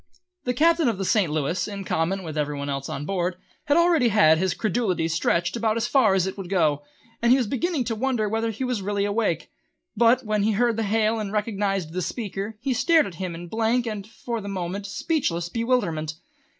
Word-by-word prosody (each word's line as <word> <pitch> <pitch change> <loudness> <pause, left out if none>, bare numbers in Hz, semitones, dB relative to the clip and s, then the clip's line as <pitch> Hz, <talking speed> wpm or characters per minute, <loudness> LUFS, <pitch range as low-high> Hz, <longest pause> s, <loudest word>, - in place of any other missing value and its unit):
The 250 -1 0
Captain 330 +1 +4
of 220 - -2
the 195 - -2
St. 190 -5 +2
Louis, 155 +3 -1
in 200 -2 -6
common 185 +2 -1
with 160 -3 -6
every 150 -1 -1
one 140 0 -4
else 140 0 -4
on 145 - -4
board, 180 -1 -1 0.3
had 290 +2 +3
already 340 -7 +4
had 180 -8 +5
his 185 0 0
credulity 190 -6 0
stretched 170 +2 0
about 225 -1 0
as 230 - 0
far 240 -7 +4
as 185 -2 +2
it 190 +1 -5
would 185 -3 -6
go, 155 -6 +2 0.4
and 235 +1 +4
he 260 - +7
was 255 - +1
beginning 275 - -1
to 230 - -2
wonder 235 -1 0
whether 225 +2 -1
he 225 +4 -4
was 250 -5 -1
really 200 +1 -1
awake; 205 -6 -1 0.4
but 235 +2 +4
when 215 -1 0
he 215 +2 +2
heard 235 +2 +2
the - - 0
hail 220 +1 +1
and 205 -2 -4
recognised 200 -5 -1
the 185 - -2
speaker 205 +2 -4
he 265 +1 0
stared 315 +6 +4
at 190 - -7
him 180 -2 -3
in 175 +1 -8
blank 225 +5 +1
and, 210 -3 -5
for 230 0 -5
the 200 - -6
moment, 195 +1 -4
speechless 190 - -1
bewilderment. 195 -10 0
205 Hz, 215 wpm, -24 LUFS, 180-235 Hz, 0.4 s, he